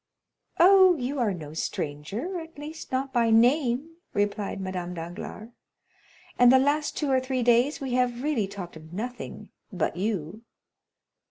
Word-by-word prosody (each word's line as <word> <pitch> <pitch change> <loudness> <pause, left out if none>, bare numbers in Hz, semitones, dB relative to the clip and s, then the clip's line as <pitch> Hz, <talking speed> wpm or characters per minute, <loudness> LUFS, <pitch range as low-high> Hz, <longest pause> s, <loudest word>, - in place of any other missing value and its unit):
"Oh, 375 -1 +7
you 265 +2 -3
are 230 -4 +2
no 155 -5 -7
stranger—at 225 - -4
least 305 +2 -8
not 265 +1 -2
by 235 -2 +3
name," 255 +6 +3 0.2
replied 205 0 -1
Madame 180 -2 -4
Danglars, 175 +6 -7 0.9
"and 245 0 +8
the 260 - +7
last 290 +3 +1
two 290 -3 0
or 260 - +4
three 255 -1 -2
days 245 +5 +3
we 265 -3 -4
have 250 0 0
really 275 -9 0
talked 195 -4 -8
of 160 +1 -12
nothing 245 +6 -6 0.2
but 175 -3 -2
you. 195 -1 -3
240 Hz, 145 wpm, -26 LUFS, 195-280 Hz, 0.9 s, and